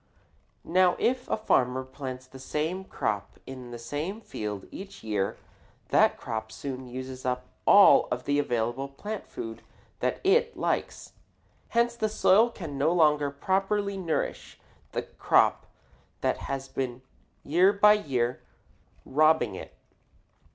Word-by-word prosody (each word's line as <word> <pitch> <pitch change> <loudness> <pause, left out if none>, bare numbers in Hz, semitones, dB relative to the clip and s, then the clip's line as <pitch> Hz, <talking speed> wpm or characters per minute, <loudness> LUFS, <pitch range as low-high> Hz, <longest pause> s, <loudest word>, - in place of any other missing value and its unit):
Now 180 0 +4
if 250 +1 0
a - - +1
farmer 130 - +1
plant 130 -1 -8
the 130 - -11
same 160 +8 -3
crop 100 - -3
in 130 -2 -9
the 120 - -7
same 150 - -4
field 105 - -5
each 195 - -9
year, 105 -3 -1 0.5
that - - +4
crop 110 0 -5
soon 130 -1 -6
uses 130 +1 -7
up 125 0 -2 0.2
all 200 -8 +7
of 125 0 -3
the 145 0 +2
available 120 0 -1
plant 205 +10 -7
food 115 -1 -7 0.4
that - - -1
it 470 +5 +3
likes. - - -2 0.5
Hence 235 0 +1
the 220 -2 -1
soil 215 +2 +4
can 160 -11 -7
no 155 +4 +3
longer 150 -4 +3
properly 195 +7 0
nourish 175 -4 -3 0.3
the - - -2
crop - - +2 0.5
that - - +1
has 135 0 -3
been 130 -2 -4 0.4
year 180 +6 +4
by 210 +1 +6
year 130 - -1 0.6
robbing 155 -5 +3
it. - - -9
145 Hz, 135 wpm, -28 LUFS, 125-195 Hz, 0.6 s, all